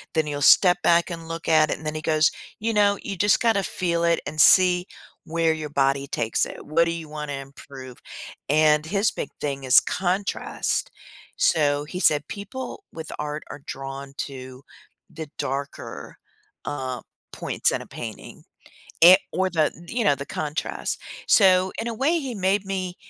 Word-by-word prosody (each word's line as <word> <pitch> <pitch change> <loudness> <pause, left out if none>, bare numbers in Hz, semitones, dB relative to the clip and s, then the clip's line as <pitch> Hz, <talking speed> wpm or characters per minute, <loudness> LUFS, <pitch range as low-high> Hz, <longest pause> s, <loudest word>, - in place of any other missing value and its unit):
then 160 -1 +2
you'll 145 -1 -4
step 180 +4 +6
back 170 +1 +3
and 165 -1 -7
look 165 0 -6
at 155 -1 +4
it, - - -1
and 155 - -13
then 155 0 -3
he 155 - -4
goes, 155 0 +2 0.3
"You 225 +1 -1
know, 205 -1 +3
you 200 - -4
just 205 +2 +3
gotta 225 -4 +3
feel 170 -2 -1
it, 170 0 +2
and 155 +1 0
see 180 -1 +5 0.4
where 165 0 +1
your 155 -2 -5
body 140 0 +1
takes 115 -3 0
it. - - -10
What 165 +3 +2
do 165 - -1
you 165 -2 -6
wanna 150 -1 -5
improve?" 135 -2 -10 0.5
And 150 0 +4
his 200 +5 +1
big - - -5
thing 140 -2 -3
is 130 - +7
contrast. 190 +2 -2 0.5
So, 145 -3 +2
he 180 +4 -6
said, 150 -4 +2
"People 250 - -7
with 160 -1 -7
art 150 0 -4
are - - -8
drawn 135 +1 -7
to 130 -1 -7 0.5
the 160 -2 -8
darker, 140 +1 -5 0.5
um, 130 -4 -4 0.3
points - - 0
in - - -2
a - - -17
painting." - - -9 0.6
A 185 +2 +10
or 185 +1 0
the, 160 -3 +2
th 170 +1 -13
you 235 -1 -1
know, 145 - +4
the 140 - -7
contrast. 150 +2 -3 0.3
So, 185 -2 +5
in 235 - -4
a 230 - -3
way, 315 +7 +1
he 260 -5 -5
made 195 +1 0
me 185 -2 -3
160 Hz, 175 wpm, -24 LUFS, 145-185 Hz, 0.6 s, A